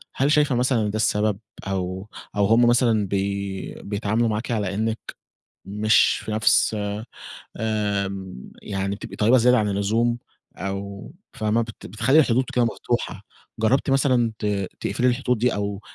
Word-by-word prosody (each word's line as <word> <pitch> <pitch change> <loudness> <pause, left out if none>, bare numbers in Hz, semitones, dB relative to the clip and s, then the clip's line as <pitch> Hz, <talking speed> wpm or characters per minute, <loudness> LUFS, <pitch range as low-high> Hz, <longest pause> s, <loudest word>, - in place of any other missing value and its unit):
هل 140 +3 +2
شايفة 145 -4 +3
مثلًا 125 -1 +2
إن 105 - 0
ده 105 - -4
السبب؟ 105 -1 +1 0.3
أو 95 +1 -3 0.3
أو 100 -1 +3
هم 115 +3 +5
مثلًا 115 -4 +3
بي 100 0 -3
بيتعاملوا 105 +3 0
معاكِ 110 +3 -2
على 100 -4 -1
إنِّك 110 +1 -1 0.7
مش 105 +2 +3
في - - -5
نَفْس 110 0 +3 0.8
آمم 100 - -3
يعني 100 0 -3
بتبقي - - -9
طيبة 115 +5 +4
زيادة 125 +1 +5
عن 105 -1 +1
اللزوم 110 +4 +1 0.4
أو 100 +5 -5 0.2
فاهمة 110 +2 0
بت 115 -1 -9
بتخلّي 115 +8 +2
الحدود 130 -3 +4
كده 120 -1 +3
مفتوحة، 115 -2 -2 0.4
جربتِ 130 +5 +2
مثلًا 130 -4 +2
ت 105 - -3 0.3
تقفلي 120 +6 0
الحدود 125 -1 +1
دي؟ 125 +2 +1
أو 100 -1 -3
110 Hz, 145 wpm, -23 LUFS, 100-120 Hz, 0.8 s, هم